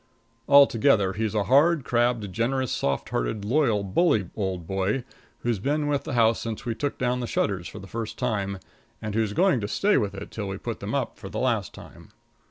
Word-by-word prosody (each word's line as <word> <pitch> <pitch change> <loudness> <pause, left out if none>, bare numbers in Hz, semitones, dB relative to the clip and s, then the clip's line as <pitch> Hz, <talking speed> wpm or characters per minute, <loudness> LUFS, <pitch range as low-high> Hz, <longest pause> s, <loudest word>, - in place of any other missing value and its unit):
Altogether 130 -7 +5
he's 110 +1 -2
a 105 - +2
hard, 145 +6 +4
crabbed, 120 -5 +1
generous, 125 +3 0
soft 70 -1 -1
hearted, - - -2
loyal, 115 -4 +2
bully 100 - +1
old 95 -4 -3
boy, 95 +7 -1 0.4
who's 120 -4 0
been 145 +7 0
with 145 -1 -1
the - - -4
house 115 -1 +4
since 115 -2 -5
we 120 - -1
took 145 +5 -3
down 125 0 0
the 120 - -3
shutters 95 -6 -1
for - - -10
the 95 - -9
first 110 +2 -5
time, 100 -6 -1 0.4
and 110 -1 -5
who's 110 -1 0
going 180 - +3
to 100 - -2
stay 205 - +2
with 100 -5 -1
it 100 +1 -8
till 105 -3 -4
we 95 0 -4
put - - -5
them - - -3
up - - -2
for - - -8
the - - -6
last - - 0
time. - - -13
110 Hz, 205 wpm, -25 LUFS, 100-130 Hz, 0.4 s, Altogether